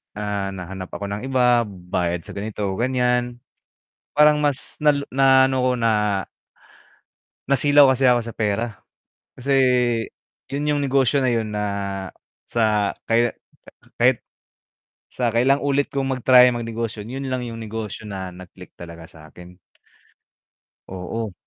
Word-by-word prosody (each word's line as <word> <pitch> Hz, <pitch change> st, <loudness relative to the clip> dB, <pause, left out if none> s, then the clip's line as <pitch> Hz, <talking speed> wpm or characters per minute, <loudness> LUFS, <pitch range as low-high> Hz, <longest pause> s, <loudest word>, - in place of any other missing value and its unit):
Ah, 100 Hz, -2 st, -3 dB
nahanap 95 Hz, 0 st, -8 dB
ako 100 Hz, 0 st, -5 dB
ng 100 Hz, +1 st, -4 dB
iba, 125 Hz, -3 st, +3 dB
bayad 90 Hz, -3 st, -3 dB
sa -, -, -11 dB
ganito, 105 Hz, +1 st, -5 dB, 0.2 s
gan'yan. 125 Hz, -1 st, 0 dB, 0.8 s
Parang 150 Hz, 0 st, +5 dB
mas 145 Hz, 0 st, -3 dB
nalo 145 Hz, -2 st, +2 dB
na 135 Hz, -1 st, +5 dB
ano 130 Hz, -1 st, 0 dB
ko, 130 Hz, 0 st, +2 dB
na 115 Hz, -1 st, +2 dB, 1.6 s
nasilaw 145 Hz, 0 st, +5 dB
kasi 130 Hz, 0 st, +2 dB
ako 120 Hz, -1 st, +4 dB
sa 115 Hz, -, -7 dB
pera, 110 Hz, +1 st, 0 dB, 0.7 s
kasi, 135 Hz, +2 st, -1 dB, 1.0 s
'yun 145 Hz, +2 st, -3 dB
yung 145 Hz, -, 0 dB
negosyo 135 Hz, -1 st, +2 dB
na 130 Hz, -, +2 dB
'yun 110 Hz, -3 st, -1 dB
na 105 Hz, 0 st, -2 dB, 0.9 s
sa, 105 Hz, -3 st, +1 dB
kaya 115 Hz, +1 st, +2 dB
k -, -, -51 dB, 0.5 s
kahit, 125 Hz, -1 st, +5 dB, 0.9 s
sa 120 Hz, -2 st, -2 dB
kailang 130 Hz, +5 st, +2 dB
ulit 145 Hz, 0 st, +1 dB
kong 135 Hz, -1 st, -2 dB
mag-try, 125 Hz, 0 st, +6 dB
magnegosyo 115 Hz, -2 st, -4 dB
'yun 135 Hz, +3 st, -5 dB
lang 130 Hz, -, -1 dB
'yung 115 Hz, -, -7 dB
negosyo 110 Hz, -1 st, -6 dB
na 95 Hz, -4 st, -7 dB
nag 90 Hz, -1 st, -12 dB
click 90 Hz, -1 st, -15 dB
talaga 85 Hz, -1 st, -11 dB
sa 80 Hz, -1 st, -16 dB
'kin. 90 Hz, 0 st, -14 dB, 1.3 s
Oo. 95 Hz, +3 st, -5 dB
115 Hz, 135 wpm, -22 LUFS, 100-130 Hz, 1.6 s, mag-try